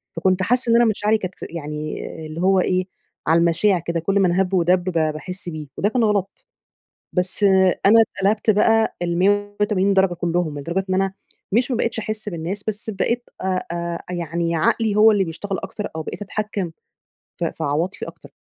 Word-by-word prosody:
فكنت 185 0 +1
حاسّة 245 +3 +1
إن - - +5
أنا 240 0 +6
مشاعري 215 0 +2
كانت 185 -3 -6
ف - - -11
يعني 150 -2 -5 0.2
اللي 160 +3 -6
هو 190 0 +4
إيه، 185 0 +1 0.4
على 165 +1 +5
المَشاع 170 +3 +3
كده، 170 0 -2
كل 195 +4 +1
من 185 -3 +3
هَب 190 +1 +1
ودَب، 180 0 +3
ب 185 - -2
باحس 165 +4 -2
بيه. 155 -2 -6
وده 205 - +2
كان 240 0 +1
غلط، 205 - -1 0.7
بس 180 +3 -1 0.4
أنا 225 +2 +7
اتقلبت 210 +1 +1
بقى 225 +2 +3
ال180 200 +2 +1
درجة 190 -2 +3
كلهم، 170 -3 -1
لدرجة 170 +6 -2
إن - - +2
أنا 195 0 0 0.4
مش 245 +4 +2
ما 245 - +1
بقيتش 230 -1 -1
أحِسْ 215 -1 -4
بالناس، 180 +3 -4
بس 215 +1 -3
بقيت 235 +5 -1
آآ، 185 -1 -1
آآ 170 0 -3
يعني 170 0 -1
عقلي 210 +6 +2
هو 220 +1 +7
اللي 200 -2 +2
بيشتغل 190 +3 -4
أكتر، 205 +2 -5
أو 160 - -2
بقيت 205 - -6
أتحكّم 205 -3 -3 0.7
ف 175 - -4
في 165 - -4
عواطفي 160 +7 -2
أكتر. - - -13
190 Hz, 180 wpm, -21 LUFS, 170-210 Hz, 0.7 s, أنا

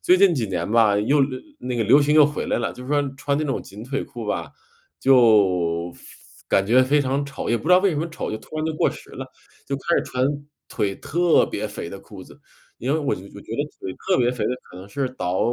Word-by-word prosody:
最 180 - +5
近 190 -4 +5
几 120 -6 -1
年 90 0 -3
吧， 110 -3 +4
又 140 +8 +2
流 130 -1 0 0.2
那 125 -1 -4
个 115 - +1
流 135 +7 +6
行 150 +1 +2
又 155 -1 +8
回 150 - -4
来 - - 0
了， 120 - -2
就 125 - -10
是 - - -10
说 145 -1 +3
穿 140 0 -1
那 155 - -1
种 135 - -2
紧 100 +3 -11
腿 135 +2 -3
裤 120 -4 -8
吧， - - -3 0.5
就 95 -9 +4
非 - - -18 0.5
感 95 - +3
觉 125 +4 +5
非 145 +3 +3
常 140 +1 0
丑。 140 - -6
也 120 - +3
不 - - -8
知 175 - 0
道 180 - +8
为 200 -1 +3
什 155 - -3
么 160 +3 -2
丑， 165 - -5
就 110 - -3
突 155 - -11
然 155 - -1
就 160 - -1
过 - - +2
时 - - -12
了， - - -7 0.4
就 140 - -2
开 170 +5 0
始 - - -1
穿 130 0 -1 0.4
腿 100 -2 -1
特 175 +2 +2
别 - - -3
肥 - - -7
的 - - -8
裤 - - -12
子。 - - -17 0.4
因 130 +4 -1
为 160 - +1
我 145 - -1
就 90 - -10
我 100 - -12
觉 - - -9
得 145 - +1 0.2
腿 95 - -5 0.2
特 190 - +4
别 120 0 +3
肥 125 - -3
的 - - 0 0.2
可 90 - -12
能 95 +2 -10
是 135 +3 -2
倒 95 -7 -2
130 Hz, 285 characters per minute, -23 LUFS, 105-145 Hz, 0.5 s, 又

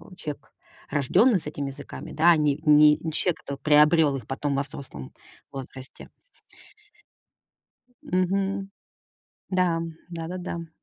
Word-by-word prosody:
человек, 150 -5 -8 0.4
рождённый 205 - +4
с - - -10
этими 145 -2 -4
языками, 135 - -9
да, 155 - -3
а 165 - +5
не 150 -2 +1
не 150 0 +7
человек, 175 +2 -1
который 140 - -5
приобрёл 150 -1 +5
их 120 - -9
потом 140 +1 -2
во 140 - +1
взрослом 130 - -9 0.4
возрасте. 130 -1 -10 1.9
Мгм. 195 +2 -1 0.8
Да, 180 -3 +1 0.3
да-да-да. 170 0 -6
150 Hz, 110 wpm, -25 LUFS, 140-175 Hz, 1.9 s, не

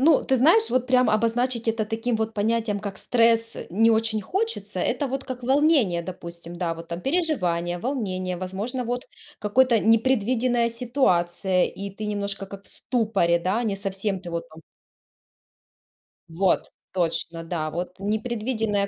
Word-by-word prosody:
Ну, 305 +2 +5
ты 265 - +2
знаешь, 340 - +5
вот 255 0 +1
прям 255 -1 +4
обозначить 230 +2 +1
это 225 -1 +1
таким 225 +3 -2
вот 220 0 -2
понятием, 220 0 0
как 200 -1 -6
стресс, 230 -1 +2
не 225 +6 +4
очень 220 -1 +1
хочется. 440 - -3
Это 285 -3 0
вот 270 +1 -3
как 255 -1 -6
волнение, 265 - +3
допустим, 170 -1 -8
да, 170 -2 -1
вот 165 0 -10
там. 170 +1 -4
Переживание, 180 - 0
волнение, 185 -7 -2
возможно, 200 +8 -3
вот 245 +1 -3 0.3
какой-то 230 +2 +3
непредвиденная 235 +1 +2
ситуация, 190 -7 +1
и 200 0 -5
ты 210 +2 -6
немножко 200 -1 -3
как 200 0 -10
в - - -16
ступоре, 205 -8 +1
да, 190 +7 0
не 205 -3 0
совсем 195 0 -3
ты 175 -2 -8
вот 170 0 -4
там 160 0 -14 1.7
вот 180 +3 +1 0.2
точно, 165 -2 -1
да, 165 -2 -3
вот 180 +3 -5
непредвиденная 220 0 -1
215 Hz, 150 wpm, -25 LUFS, 185-245 Hz, 1.7 s, Ну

